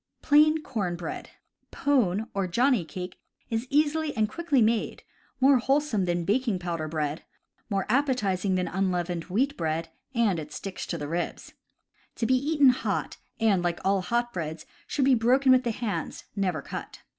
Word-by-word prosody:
Plain 305 +1 +5
Corn 200 -9 -2
Bread. 170 -1 -6 0.2
— - - -48
^Pone 225 -7 +1
or 195 -2 -1
johnny 240 +3 +2
cake 180 +2 -7 0.3
is 225 +3 -1
easily 300 0 +1
and 215 -1 +3
quickly 305 +3 0
made, 225 0 +1 0.4
more 265 0 +5
wholesome 270 -6 +1
than 175 -1 -1
baking 225 0 +1
pow 175 -1 -3
der 155 -1 -4
bread, 155 0 -2 0.5
more 195 -3 0
appetizing 210 -7 +1
than 180 -1 0
unleavened 180 -2 -1
wheat 255 +10 0
bread 165 0 -2 0.3
and 215 -7 +2
it 150 -1 -8
"sticks 195 +4 -6
to 170 - -3
the 145 -2 -5
ribs." 170 +3 -4 0.6
To 230 - -1
be 260 - +3
eaten 285 +1 +4
hot, 250 - -1 0.2
and, 210 -5 +3
like 175 -1 -1
all 195 0 +3
hot 240 +5 -1
breads, 160 -2 -5 0.2
should 275 - 0
be 270 - +5
broken 255 +3 +4
with 255 0 +5
the 240 - -1
hands, 225 -2 -3
never 185 -7 -1
cut. - - -7
210 Hz, 170 wpm, -27 LUFS, 175-260 Hz, 0.6 s, Plain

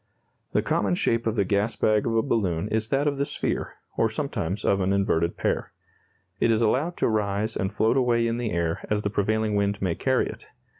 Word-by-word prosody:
The - - +2
common 95 -3 +1
shape 115 +5 0
of 110 - 0
the 100 -3 +2
gas 100 +4 0
bag 110 +1 +2
of 115 - 0
a 115 - +3
balloon 100 -8 0
is 110 0 0
that 135 +4 +1
of 145 -2 0
the - - +3
sphere, 145 - -3 0.2
or - - +3
sometimes 90 +5 -3
of 100 0 +2
an 95 +1 +1
inverted 85 -4 +1
pear. - - -1 0.7
It - - +3
is 115 0 +3
allowed 145 +10 +1
to - - +2
rise 105 0 0
and 95 - -1
float 110 +4 +2
away 120 -2 +2
in 115 0 0
the 120 -2 -2
air 85 -1 -1
as 105 0 0
the 100 - -1
prevailing 110 +1 0
wind 100 0 +1
may 95 -3 0
carry - - +1
it. - - -8
105 Hz, 215 wpm, -25 LUFS, 100-115 Hz, 0.7 s, a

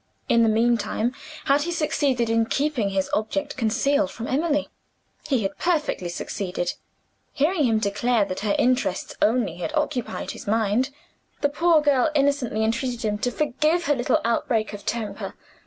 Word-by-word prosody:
In 235 - +4
the 225 - +4
meantime, 230 +1 +1 0.3
had 280 +1 +3
he 345 +4 -2
succeeded 285 -7 +1
in 225 0 +2
keeping 270 -8 0
his 195 -1 0
object 290 +7 -1
concealed 275 +5 +1
from 230 - -7
Emily? 295 +2 0 0.6
He 260 -7 +1
had 195 - -3
perfectly 300 - 0
succeeded. 175 0 -3 0.6
Hearing 305 +1 +2
him 225 -2 +3
declare 215 +2 +1
that 185 -1 -4
her 205 -1 0
interests 250 -7 +1
only 220 -6 +2
had 300 - -4
occupied 295 -5 -2
his - - -10
mind, 225 +4 +1 0.5
the 285 - +3
poor 325 +2 +3
girl 285 -1 +3
innocently 275 -6 +1
entreated 235 +1 -1
him 210 -1 -1
to 245 - 0
forgive 305 +5 +1
her 290 - +2
little 245 - +1
outbreak 230 -1 0
of 205 - -9
temper. 225 -2 -3
245 Hz, 155 wpm, -24 LUFS, 215-290 Hz, 0.6 s, In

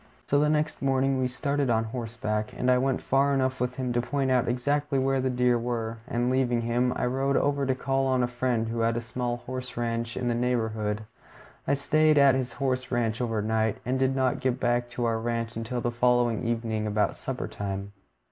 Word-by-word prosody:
So 145 +1 +3
next 155 0 0
morning 135 0 +2
we 130 - +1
started 140 +1 -1
on 115 -1 +2
horseback, 110 -2 -3
and 125 - +2
I 125 - +4
went 135 0 0
far 140 +1 +2
enough 130 -1 0
with 125 0 -1
him 125 -2 -2
to 120 - +2
point 135 +1 -1
out 125 -2 +2
exactly 140 +4 0
where 135 0 +1
the 130 - 0
deer 125 -1 +2
were, 115 -1 -3
and 125 -2 0
leaving 125 -2 +1
him, 120 +2 +1
I - - -1
rode 135 +2 +1
over 140 -1 +1
to 130 - +1
call 135 +1 0
on 130 -1 +2
a - - +2
friend 120 -2 -1
who 115 0 -3
had 115 0 +1
a - - +1
small 120 +1 -3
horse 130 -1 -6
ranch 115 0 -2
in 125 -1 -2
the 120 - +2
neighborhood. 110 -3 -1 0.6
I - - +3
stayed 155 +2 +3
at 140 -1 +7
this 130 -2 -1
horse 130 -2 -1
ranch 120 -1 0
overnight, 110 -1 0
and 130 +2 0
did 135 0 +2
not 130 -2 +1
get 130 -1 0
back 120 0 +1
to 120 0 -2
our 115 -1 +1
ranch 115 0 -2
until 115 +2 -3
the 120 - -1
following 120 -1 +2
evening 115 -2 -1
about 105 0 +1
supper - - -4
time. 100 0 -5
125 Hz, 210 wpm, -27 LUFS, 115-130 Hz, 0.6 s, at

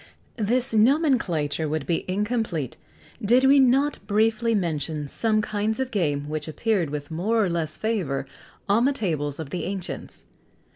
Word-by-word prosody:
[XX - - -18
104] 215 +3 +1
This 255 -1 +1
nomenclature 215 - +2
would 155 -2 -2
be 170 - -1
incomplete, 205 - -1 0.5
did 240 +5 +4
we 275 +1 +6
not 270 +2 +3
briefly 220 +2 +2
mention 155 -5 -2
some 215 +7 +1
kinds 215 +2 -1
of 260 -1 -2
game 145 -9 0
which 155 0 -4
appeared 180 +1 0
with 145 +1 -5
more 210 +7 +1
or - - -1
less 160 -2 -2
favour 180 -12 -1 0.4
on 220 +4 +3
the 280 - +3
tables 155 - -2
of 150 -3 -6
the 180 - -3
ancients. 190 -1 -6
200 Hz, 160 wpm, -25 LUFS, 155-230 Hz, 0.5 s, we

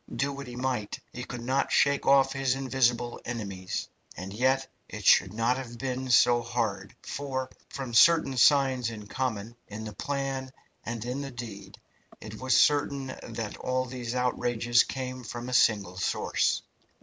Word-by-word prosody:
Do 140 +1 0
what 140 -1 -7
he 120 - -8
might, 125 -4 -2
he 125 - -5
could 120 -1 -7
not 130 +3 0
shake 140 0 +3
off 135 -1 +5
his 135 -1 +1
invisible 125 -3 0
enemies. 100 -6 -4 0.3
And 95 +2 -6
yet 130 +4 +2 0.2
it - - -7
should 95 - +6
not 115 +4 +1
have 120 -3 -7
been 130 +1 -3
so 120 -1 +5
hard, 115 -3 -3
for, 130 -2 -4 0.2
from 130 -4 -6
certain 155 +2 +5
signs 130 -2 +4
in 105 -2 -8
common, 115 -1 -3
in 105 +2 -7
the 110 -1 -6
plan 135 +2 -3 0.3
and 115 -1 -5
in 125 +3 -3
the 140 - -5
deed, 110 -6 -9 0.4
it 110 0 -9
was 130 0 +4
certain 140 -2 +2
that 115 -2 -6
all 130 0 -1
these 125 -1 -5
outrages 120 -2 +2
came 130 -1 -5
from 120 +2 -6
a - - -4
single 100 -6 +3
source. 90 - 0
125 Hz, 160 wpm, -28 LUFS, 115-135 Hz, 0.4 s, should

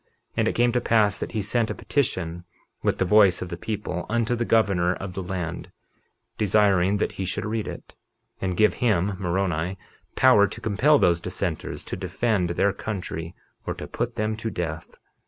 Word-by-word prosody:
51:15 - - -45 0.3
And - - +2
it - - 0
came 120 0 +3
to 125 0 +1
pass 105 -4 +3
that - - -5
he 110 -3 -1
sent 115 +3 0
a - - -3
petition, 90 - -2 0.4
with - - +1
the - - +1
voice 95 -2 +5
of 90 - -7
the 85 - -4
people, 95 -2 -4
unto 120 +1 +1
the 120 0 -1
governor 95 -6 +2
of 95 -1 -6
the 95 - -4
land, 90 -2 -5 0.7
desiring 100 -2 +3
that - - 0
he 95 - -5
should 90 - -3
read 110 0 -2
it, - - -8 0.5
and 95 -2 -2
give 105 -1 +4
him 100 -4 +2
(Moroni) 90 -1 -1 0.4
power 105 -6 +6
to 115 - -9
compel 120 +7 +3
those 85 -8 +3
dissenters 90 -2 -4
to - - -5
defend 95 +1 0
their 95 +3 +1
country 90 -5 -5 0.3
or - - -2
to - - -7
put 120 0 -3
them 110 -1 -1
to 115 +1 -3
death. 80 -6 -5
100 Hz, 190 wpm, -25 LUFS, 90-110 Hz, 0.7 s, power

